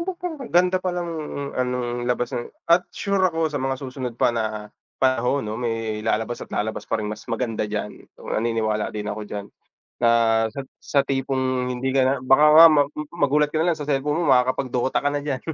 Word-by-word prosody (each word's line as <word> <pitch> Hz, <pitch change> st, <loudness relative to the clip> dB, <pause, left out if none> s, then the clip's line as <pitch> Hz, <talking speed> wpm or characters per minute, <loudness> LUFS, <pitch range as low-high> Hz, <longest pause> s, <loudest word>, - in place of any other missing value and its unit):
"Ba't 375 Hz, -, -2 dB
parang 340 Hz, -3 st, -5 dB
ang 255 Hz, -, -7 dB
ganda 180 Hz, +1 st, +3 dB
palang 180 Hz, -2 st, -2 dB, 0.5 s
anong 120 Hz, -1 st, -2 dB
labas 125 Hz, 0 st, -1 dB
na," 120 Hz, -, -4 dB, 0.2 s
at 175 Hz, +2 st, +3 dB
sure 200 Hz, -1 st, -1 dB
ako 165 Hz, -4 st, +1 dB
sa 145 Hz, -, -2 dB
mga 135 Hz, 0 st, -1 dB
susunod 130 Hz, -2 st, -6 dB
pa 120 Hz, -, +2 dB
na 110 Hz, -2 st, -3 dB, 0.2 s
panahon 130 Hz, +1 st, +1 dB
'no, 110 Hz, +2 st, -4 dB
may 115 Hz, -2 st, -2 dB
lalabas 110 Hz, +2 st, -1 dB
at -, -, -8 dB
lalabas 110 Hz, +1 st, -3 dB
pa -, -, +1 dB
ring 110 Hz, -, -4 dB
mas -, -, -8 dB
maganda 115 Hz, -4 st, -2 dB
diyan. 105 Hz, 0 st, -5 dB
Naniniwala 110 Hz, -1 st, -1 dB
din 105 Hz, -1 st, -5 dB
ako 105 Hz, +1 st, -4 dB
diyan 100 Hz, -1 st, -5 dB, 0.6 s
na -, -, +6 dB, 0.4 s
sa 140 Hz, -, -7 dB, 0.2 s
sa 140 Hz, -, +1 dB
tipong 130 Hz, -1 st, -1 dB
hindi 130 Hz, +2 st, -2 dB
ka 135 Hz, -, +5 dB
na 130 Hz, +1 st, +3 dB
baka 135 Hz, +3 st, +4 dB
nga 160 Hz, +2 st, +10 dB
ma 150 Hz, -3 st, +5 dB, 0.4 s
magulat 150 Hz, +1 st, +3 dB
ka 150 Hz, -, -9 dB
nalang 160 Hz, 0 st, +1 dB
sa 145 Hz, -, -5 dB
cellphone 150 Hz, +2 st, 0 dB
mo 145 Hz, -6 st, +4 dB
makakapag 130 Hz, +1 st, +1 dB
Dota 125 Hz, +1 st, 0 dB
ka 145 Hz, -, -1 dB
na 145 Hz, 0 st, -1 dB
diyan, 140 Hz, -3 st, -2 dB
130 Hz, 200 wpm, -23 LUFS, 115-150 Hz, 0.6 s, nga